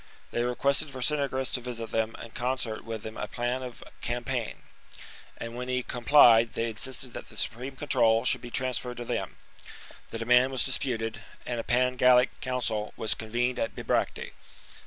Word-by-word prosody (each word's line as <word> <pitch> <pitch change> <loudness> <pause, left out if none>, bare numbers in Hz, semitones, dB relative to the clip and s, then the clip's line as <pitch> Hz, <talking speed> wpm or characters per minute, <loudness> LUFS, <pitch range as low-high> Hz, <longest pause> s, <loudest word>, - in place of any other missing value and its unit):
They 120 - 0
requested 135 +4 +2
Ver 130 -2 -7
cingetorix 135 -2 0
to 125 - 0
visit 115 -2 -5
them 110 0 0
and 115 - -10
concert 125 -3 -2
with 110 -1 -6
them 110 - -7
a - - -3
plan 120 +1 -2
of 125 -2 -8 0.2
campaign; 120 -1 -3 0.7
and 115 0 -6
when 125 +1 -4
he 125 0 0
complied, 120 -2 +6
they 115 0 -1
insisted 130 +2 -3
that - - -8
the - - -12
supreme 125 +4 -2
control 115 -5 +3
should - - +3
be 120 - -8
trans 130 0 0
ferred 125 -1 -7
to 120 - -5
them. - - -3 0.7
The - - -5
demand 125 +3 +4
was 130 - +2
disputed; 115 -5 -1 0.2
and 120 -1 -2
a - - -2
Pan 125 +1 +2
Gallic 125 0 +4
council 115 -4 -2
was 110 - +1
convened 120 +3 -1
at 115 - -2
Bibracte. - - -1
125 Hz, 180 wpm, -28 LUFS, 115-130 Hz, 0.7 s, complied